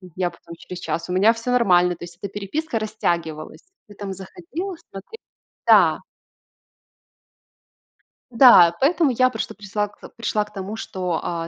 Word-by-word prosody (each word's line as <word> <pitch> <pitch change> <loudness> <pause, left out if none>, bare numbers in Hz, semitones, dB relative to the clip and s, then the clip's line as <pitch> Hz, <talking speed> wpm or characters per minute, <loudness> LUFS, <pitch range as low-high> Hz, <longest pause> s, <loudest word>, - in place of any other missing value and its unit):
я 180 -2 -1
потом 170 0 -13
через 180 +1 -9
час: 170 - -3
"У - - -2
меня 200 +5 +5
всё 230 +2 -4
нормально". 180 -7 +3
То 170 - -12
есть 170 0 -11
эта 200 -1 -6
переписка 225 +7 -3
растягивалась. 170 -8 -3 0.3
Ты 205 - -15
там 200 -1 -6
заходила, 345 - -7 0.2
смотре 195 - -10 0.5
да. - - +5 2.3
Да. 225 -9 +7
Поэтому 315 0 +3
я 255 +1 +3
прошта 220 -3 -5
присла 205 0 -3
к 205 - -23 0.2
пришла 215 -2 -1
к 210 - -16
тому, 195 +2 -6
что, 180 -6 -3
а, 165 -1 -3
200 Hz, 150 wpm, -22 LUFS, 180-235 Hz, 2.3 s, Да